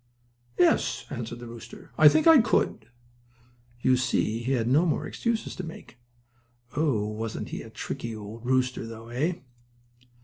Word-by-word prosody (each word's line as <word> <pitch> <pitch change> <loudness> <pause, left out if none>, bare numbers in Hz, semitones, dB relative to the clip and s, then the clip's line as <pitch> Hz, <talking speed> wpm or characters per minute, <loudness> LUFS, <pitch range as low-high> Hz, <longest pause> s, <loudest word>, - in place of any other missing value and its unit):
"Yes," 175 - +2
answered 120 -3 -5
the 120 - -9
rooster, 115 -1 -11
"I 155 -1 +8
think 155 +2 +2
I 320 -5 +8
could." 215 - 0 0.9
You 130 +1 +4
see 120 -3 0
he 130 +3 0
had 115 -3 0
no 140 +7 +4
more 170 - 0
excuses 230 -2 -2
to 185 - -4
make. 120 -8 -10 0.8
Oh, 140 -9 +1
wasn't 110 +1 -4
he - - -5
a - - -10
tricky 115 -1 -5
old 110 +2 -9
rooster, 130 -1 0
though, 115 0 -9
eh? 145 +9 0
120 Hz, 150 wpm, -27 LUFS, 115-150 Hz, 0.9 s, I